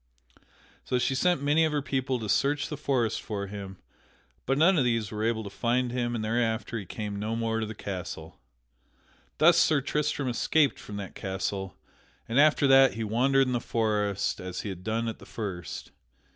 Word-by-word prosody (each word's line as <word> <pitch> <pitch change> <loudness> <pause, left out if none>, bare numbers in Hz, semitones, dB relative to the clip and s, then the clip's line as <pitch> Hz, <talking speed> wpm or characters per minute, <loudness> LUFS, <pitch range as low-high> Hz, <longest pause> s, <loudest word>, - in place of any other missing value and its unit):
So 125 - 0
she 125 - +1
sent 175 +2 +1
many 150 +3 +3
of 160 - +2
her 145 -2 -1
people 130 -2 -1
to 110 -3 -5
search 145 +7 +1
the 150 - -3
forest 130 -6 0
for 100 -2 -4
him, 100 -1 -8 0.7
but 135 +1 +2
none 170 +3 +5
of - - +3
these 115 -4 0
were 105 0 -3
able 110 0 0
to 100 - -6
find 120 +3 0
him 120 -1 -1
and 110 -2 -2
thereafter 115 0 -1
he 100 - -9
came 105 0 -5
no 110 +2 -2
more 115 -1 -1
to 110 - -2
the 110 - -7
castle. 95 -4 -6 1.0
Thus 170 +2 +6
Sir 155 -3 +4
Tristram 145 0 -1
escaped 140 +4 +2
from 105 - -9
that 100 -2 -6
castle 95 -1 -4 0.5
and 115 +4 +1
after 150 0 +5
that 135 -1 +6
he 115 - -3
wandered 130 +5 +3
in 130 - -1
the 120 - 0
forest 105 -4 0
as 90 -1 -5
he 105 - -5
had 90 -2 -7
done 115 +2 -1
at 115 - -4
the - - -13
first. 95 -6 -6
115 Hz, 195 wpm, -28 LUFS, 105-135 Hz, 1.0 s, Thus